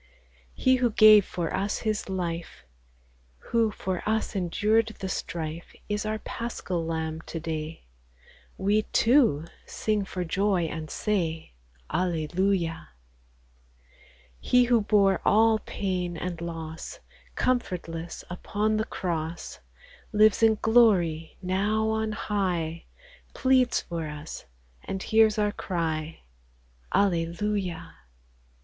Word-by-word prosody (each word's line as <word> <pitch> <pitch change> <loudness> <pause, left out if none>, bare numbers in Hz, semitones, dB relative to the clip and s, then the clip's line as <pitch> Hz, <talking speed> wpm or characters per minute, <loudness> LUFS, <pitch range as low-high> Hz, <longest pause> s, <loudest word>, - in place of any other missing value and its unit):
He 260 0 +3
who 250 -1 +2
gave 215 -2 +7
for 170 -3 -3
us 200 +1 -1
His 215 -2 -1
life, 175 -3 -4 0.9
Who 230 -1 +3
for 190 -3 -3
us 220 0 -1
endured 215 +5 +1
the 190 - -3
strife, 165 -2 -5
Is 210 +1 -1
our 215 0 -1
Paschal 215 -6 -4
Lamb 160 -1 -3
to 165 - -4
day 160 0 -5 0.4
\ - - -26
We, 205 +3 +2
too, 225 - +3 0.2
sing 215 -2 -1
for 180 -1 -4
joy, 190 +1 +1
and 160 -1 -4
say, 165 - -2 0.2
— - - -21
Alleluia! 175 0 0 1.5
He 250 0 +4
who 240 -2 +3
bore 200 -2 +3
all 220 +1 +4
pain 180 -4 -3
and 175 0 -4
loss, 165 -1 -6 0.4
Comfortless 175 -9 -2
upon 210 +4 -1
the 215 - 0
cross, 170 -4 -4 0.5
Lives 215 0 +4
in 220 -1 +5
glory 185 -9 +3
now 205 +4 +1
on 220 0 -1
high, 180 -6 -2 0.5
Pleads 260 -2 +3
for 165 -2 -5
us, 150 - -8 0.4
and 190 0 -4
hears 220 -1 +4
our 210 -1 +2
cry. 165 -5 -3 0.7
Alleluia 180 -1 -1
190 Hz, 115 wpm, -27 LUFS, 165-215 Hz, 1.5 s, gave